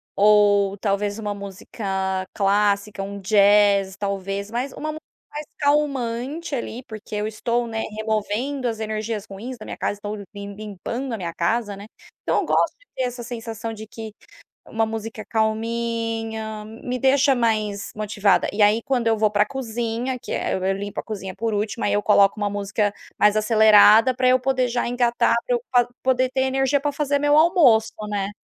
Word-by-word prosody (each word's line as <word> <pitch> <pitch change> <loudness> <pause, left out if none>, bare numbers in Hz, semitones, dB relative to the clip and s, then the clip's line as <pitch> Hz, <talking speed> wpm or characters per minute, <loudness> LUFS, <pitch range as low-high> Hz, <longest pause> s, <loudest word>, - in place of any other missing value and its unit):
ou 205 -1 +4
talvez 205 +1 -1
uma 210 -2 -3
música 190 -1 -4
clássica, 200 0 +1
um 200 +1 -6
jazz, 200 -1 +4
talvez, 200 0 -3
mas 250 +4 -2
uma 310 - -5
música 310 +1 -8 0.3
mais 300 0 -5
calmante 285 +1 -1
ali, 240 0 -5
porque 215 -2 -9
eu 210 0 -1
estou, 235 +2 -1
né, 225 -1 -3 0.2
removendo 220 +5 -2
as 225 -2 -3
energias 215 -1 -3
ruins 240 +6 -7
da 215 - -10
minha - - -7
casa. - - -1
Estou 205 +1 -6 0.2
lim 200 0 -7
limpando 215 +5 -5
a 225 - -2
minha 170 -3 -5
casa, 205 +5 -1
né. 200 +1 -10 0.4
Então - - +1
eu - - -4
gosto - - +1
de - - -27
ter 260 - -1
essa 245 -1 -4
sensação 225 -1 -6
de 220 0 -9
que 220 -1 -9 0.5
uma 225 0 0
música 220 0 -5
calminha 225 -1 -2
me 230 +3 -5
deixa 270 +2 +4
mais 215 -4 -1
motivada. 210 -2 +1
E 205 +1 0
aí, 210 +2 +5
quando 245 -3 -1
eu 225 - +3
vou 215 -1 +3
para 205 0 +3
a - - +1
cozinha, 240 0 -3
que - - -8
é, - - -1
eu 190 +1 0
limpo 200 0 -6
a - - -12
cozinha 195 -3 -6
por 225 +2 -2
último, 210 +2 -2
aí 205 - +1
eu 205 - +1
coloco 200 0 +4
uma 205 - +1
música 205 +1 -1 0.3
mais 210 0 +4
acelerada 215 +2 +6
pra 255 +1 0
eu 255 0 +5
poder 255 -1 +1
já 240 0 -1
engatar, 240 -1 +2
pra 250 - +1
eu 240 - -6
pa 245 -2 +4 0.2
poder 255 0 +2
ter 265 - -1
energia 270 +1 +1
para 290 - 0
fazer 285 0 0
meu 290 +1 +3
almoço, 305 - +5 0.2
né, 200 -1 -2
220 Hz, 185 wpm, -22 LUFS, 205-245 Hz, 0.5 s, acelerada